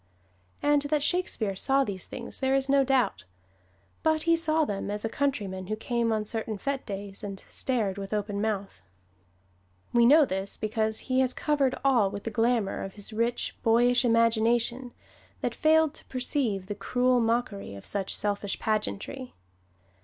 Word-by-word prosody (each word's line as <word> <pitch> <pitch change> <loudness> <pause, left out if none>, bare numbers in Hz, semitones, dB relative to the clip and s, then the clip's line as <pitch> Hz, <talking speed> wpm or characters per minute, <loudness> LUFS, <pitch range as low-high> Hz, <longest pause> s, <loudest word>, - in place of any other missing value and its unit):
And 290 0 +4
that 300 -1 +1
Shakespeare 265 - 0
saw 270 +7 +2
these 195 -7 -5
things 240 - -7
there 265 0 +2
is 270 0 +1
no 275 0 +4
doubt. 250 - +1 0.8
But 315 -1 +2
he 335 0 +4
saw 320 -1 +1
them 200 -3 -3
as 210 +1 -2
a - - -1
countryman 200 -10 -2
who 215 - -1
came 235 +1 -1
on 215 -1 0
certain 220 0 -3
fete 275 +5 -3
days, 200 0 -6
and 195 -2 -5
stared 215 -7 -2
with 195 0 -6
open 205 -1 -2
mouth. 200 - -3 1.1
We 235 -1 +6
know 300 +3 +7
this, 190 -3 -2
because 220 0 -1
he 260 -1 0
has 255 -1 +2
covered 285 -4 +1
all 240 -7 +4
with 200 +1 -7
the 225 - -4
glamour 230 -3 +1
of 195 - -6
his 205 +2 -7
rich, 230 +2 -1
boyish 245 +2 +4
imagination 230 +1 +2 0.5
that - - -1
failed 315 -1 +3
to - - -10
perceive 250 -6 -1
the 205 - -4
cruel 250 +5 +1
mockery 225 - -1
of 100 - -11
such 195 -2 -2
selfish 205 -1 -1
pageantry. 220 +4 -3
230 Hz, 165 wpm, -28 LUFS, 205-265 Hz, 1.1 s, know